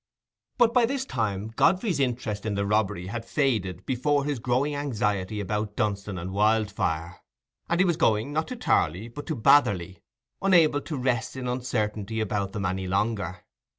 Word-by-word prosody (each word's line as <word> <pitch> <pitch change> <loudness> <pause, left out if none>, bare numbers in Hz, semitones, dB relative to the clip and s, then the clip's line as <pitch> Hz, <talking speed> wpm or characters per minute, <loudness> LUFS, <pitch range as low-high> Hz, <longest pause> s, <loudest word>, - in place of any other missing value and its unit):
But 235 -2 +4
by 245 -2 +4
this 265 +1 -2
time 110 - -2
Godfrey's 180 - +2
interest 120 -5 -1
in 110 -2 -2
the 100 0 0
robbery 105 -3 0
had 115 +5 -5
faded 110 - -1
before 140 +3 +1
his 145 -4 -2
growing 130 +5 0
anxiety 105 -8 -1
about 105 +1 -2
Dunstan 100 -2 -2
and 90 +2 -5
Wildfire, 100 -5 0 0.5
and 170 - +1
he 185 - +5
was 170 -3 +1
going, 115 -2 +1
not 160 +1 0
to 255 - -5
Tarley, 105 - 0
but 145 +5 -9
to 160 - -1
Batherley, 95 -8 +3 0.4
unable 165 -7 +4
to 155 - -5
rest 125 -2 -1
in 130 -1 -4
uncertainty 110 -4 -2
about 100 -2 -2
them 100 -2 -3
any 95 0 -2
longer. 100 -2 -1
110 Hz, 165 wpm, -26 LUFS, 100-145 Hz, 0.5 s, he